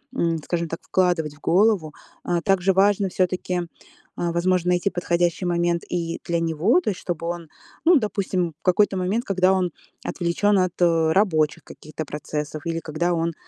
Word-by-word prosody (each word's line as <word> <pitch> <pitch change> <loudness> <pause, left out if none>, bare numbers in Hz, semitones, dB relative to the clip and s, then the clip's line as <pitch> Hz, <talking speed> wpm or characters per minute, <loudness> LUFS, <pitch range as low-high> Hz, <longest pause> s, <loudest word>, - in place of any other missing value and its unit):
м, 165 -7 +1
скажем 170 +1 -2
так, 165 +1 -5
вкладывать 175 -5 0
в - - -21
голову. 185 -4 +2 0.3
А 175 -1 0
также 195 +1 +2
важно 200 +1 +3
все-таки, 180 0 -1 0.5
а 170 -1 -1
возможно, 180 +1 +1
найти 180 +2 +2
подходящий 175 0 0
момент 170 -1 0
и 170 -1 -3
для 170 -1 0
него, 165 - +2
то 335 - -1
есть 195 - -3
чтобы 170 -2 -4
он, 170 -2 -5 0.4
ну 345 +2 +7
допустим, 190 -6 -1
в - - -46
какой-то 195 +1 +3
момент, 190 +6 -1
когда 190 -1 +3
он 185 -2 0 0.3
отвлечён 180 +4 +1
от, 185 -1 -1
э, 165 -2 +3
рабочих 160 -6 +2
каких-то 155 +1 -8
процессов 150 +1 -5
или 165 0 -1
когда 165 +2 -1
он 165 0 -1
175 Hz, 170 wpm, -23 LUFS, 165-185 Hz, 0.5 s, ну